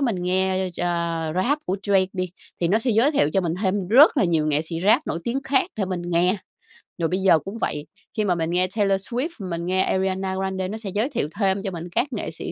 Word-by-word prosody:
mình 240 -8 0
nghe, 190 +1 +1
ơ, 185 - -5
ch - - -4 0.5
Rap 260 +11 +1
của 190 +2 0
Drake 195 -2 +3
đi, 185 -2 -3 0.3
thì 170 - +2
nó 215 +4 +3
sẽ 240 +2 +1
giới 230 +7 +4
thiệu 150 - +2
cho 195 - +3
mình 170 -2 -1
thêm 190 -1 0
rất 280 - +7
là 260 - +3
nhiều 165 -3 +1
nghệ 150 0 +2
sĩ 165 +1 -5
Rap 235 +9 +4
nổi 165 - -2
tiếng 265 +3 -2
khác 275 +7 +1
để 200 - 0
mình 185 -2 -4
nghe. 175 +3 +2 0.6
Rồi 165 - 0
bây 185 - 0
giờ 185 -4 +5
cũng 195 +7 -7
vậy. 150 0 -2 0.3
Khi 215 - +1
mà 180 -3 +2
mình 165 -1 -2
nghe 180 +1 +2
Taylor 195 -2 +2
Swift, 250 - -3
mình 170 -3 -4
nghe 185 +1 +2
Ariana 190 0 -1
Grande 190 -1 -2
nó 215 - -5
sẽ 220 -3 -6
giới 220 +7 0
thiệu 235 - -1
thêm 195 -1 +2
cho 195 - -3
mình 170 0 -7
các 255 +10 -1
nghệ - - -3
sĩ - - -6
190 Hz, 255 wpm, -23 LUFS, 180-215 Hz, 0.6 s, rất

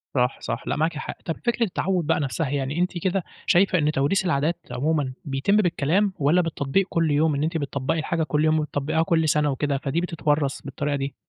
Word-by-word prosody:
صح 125 0 +1
صح، - - -4
لأ، - - 0
معاكِ 155 +1 0
حق. - - -6
طب 165 - -2
فكرة 240 0 +1
التعوّد 185 -3 -1
بقى 165 - +2
نَفسها، 140 +1 -2
يعني 140 +2 -2
أنتِ 180 0 0
كده 185 +2 0 0.2
شايفة 185 +1 +4
إن 150 -2 +2
توريث 155 +8 +1
العادات 165 0 +1
عمومًا 145 -1 0
بيتم 140 +8 +1
بالكلام، 185 +1 +2
والّا 155 +5 +4
بالتطبيق 165 +2 0
كُلّ 165 -2 +1
يوم 150 +1 +2
إن 140 - -1
أنتِ 165 +2 0
بتطبقي 140 +1 -2
الحاجة 165 +1 -1
كُلّ 150 +1 +1
يوم 155 0 +3
وبتطبقيها 150 +1 0
كُلّ 160 -1 +2
سنة 150 -1 +2
وكده، 140 +1 -1
فدي 140 +5 -1
بتتورّث 150 -5 -1
بالطريقة 140 +1 -3
دي؟ 140 -1 -3
155 Hz, 200 wpm, -24 LUFS, 140-170 Hz, 0.2 s, شايفة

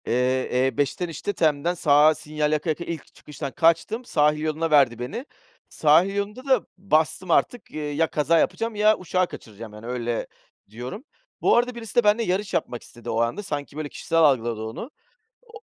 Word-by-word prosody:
Eee, 125 +1 +1
E5'ten 145 +6 -1
işte 165 +5 -4
TEM'den 155 +1 +1
sağa 150 -2 +4
sinyal 150 0 -2
yaka 155 +2 -1
yaka 160 +2 -1
ilk 165 -4 -7
çıkıştan 145 -1 -7
kaçtım. 170 - +1
Sahil 150 -5 +2
yoluna 155 +1 -1
verdi 135 -6 +4
beni. 125 - -5 0.4
Sahil 165 +6 +3
yolunda 210 +6 -4
da 260 -5 +3
bastım 175 0 0
artık, 245 +8 +1
eee, 150 +1 -1
kaza 160 +2 +2
yapacağım 225 +5 -1
ya 215 +1 +4
uçağı 185 0 0
kaçıracağım, 110 -4 -10
yani, 105 +2 -11
öyle 120 -1 -2 0.4
diyorum. 125 - -7 0.4
Bu - - +4
arada 245 +1 +1
birisi 225 -3 -8
de 240 - +5
benle 210 +2 +3
yarış 195 +1 -1
yapmak 120 - -2
istedi 120 - -11
o 115 - 0
anda 120 - -1
sanki 145 -4 -5
böyle 155 -2 -4
kişisel 165 +3 -1
algıladı 120 -7 +3
onu. 110 - -6 0.5
O 455 -2 -14
155 Hz, 170 wpm, -24 LUFS, 135-195 Hz, 0.5 s, de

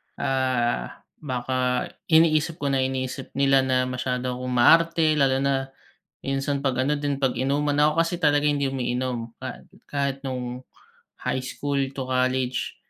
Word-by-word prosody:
ah, 130 - -1 0.2
baka 125 -2 -1 0.2
iniisip 160 0 +4
ko 140 -1 0
na 135 - +1
iniisip 130 0 -3
nila 135 -1 +4
na 130 0 +2
masyado 125 0 -2
akong 125 0 -4
maarte 160 +4 +4
lalo 135 -1 +3
na 135 -1 +1 0.6
minsan 135 +1 -1
'pag 130 -1 0
ano 150 - +2
din, 145 -1 -2
pag-inuman. 140 +2 0
Ako 150 0 +4
kasi 165 +1 +2
talaga 145 -1 +3
hindi 140 -2 +1
umiinom 125 -2 -3
ka 130 - -7 0.2
kahit 140 -1 -1
nung 125 -2 -4 0.6
high - - 0
school 140 +2 -3 0.2
to 135 - -3
college, 130 0 -1
135 Hz, 140 wpm, -24 LUFS, 130-145 Hz, 0.6 s, iniisip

